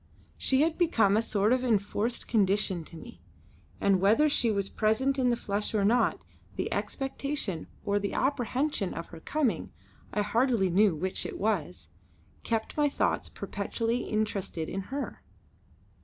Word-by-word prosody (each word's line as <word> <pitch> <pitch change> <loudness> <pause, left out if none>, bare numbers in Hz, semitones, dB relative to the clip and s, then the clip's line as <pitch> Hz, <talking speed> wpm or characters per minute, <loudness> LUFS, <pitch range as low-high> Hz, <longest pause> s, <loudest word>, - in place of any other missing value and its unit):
She 265 +1 +1
had 320 +2 +1
become 225 - +3
a 220 - +4
sort 215 0 +2
of 255 0 +1
enforced 225 0 0
condition 200 -4 +2
to 165 - -11
me, 240 +8 -12 0.6
and 195 -2 +3
whether 220 +10 +5
she 240 -5 +2
was 200 -2 0
present 260 +7 +1
in 250 -1 +3
the 240 - +3
flesh 210 -1 -2
or 200 -2 +2
not, 240 +4 +2 0.3
the - - -2
expectation 270 - -3 0.2
or 205 0 +2
the 200 0 -3
apprehension 260 -4 0
of 165 - -4
her 165 - -10
coming 285 - -1 0.4
I 210 - 0
hardly 225 -3 +2
knew 195 -1 +4
which 185 +5 -2
it - - -5
was 160 - -1 0.5
kept 225 -1 -2
my 295 -1 +3
thoughts - - 0
perpetually 230 +1 -2
interested 200 -6 -2
in 195 - -3
her. 280 +2 -4
215 Hz, 155 wpm, -29 LUFS, 195-255 Hz, 0.6 s, whether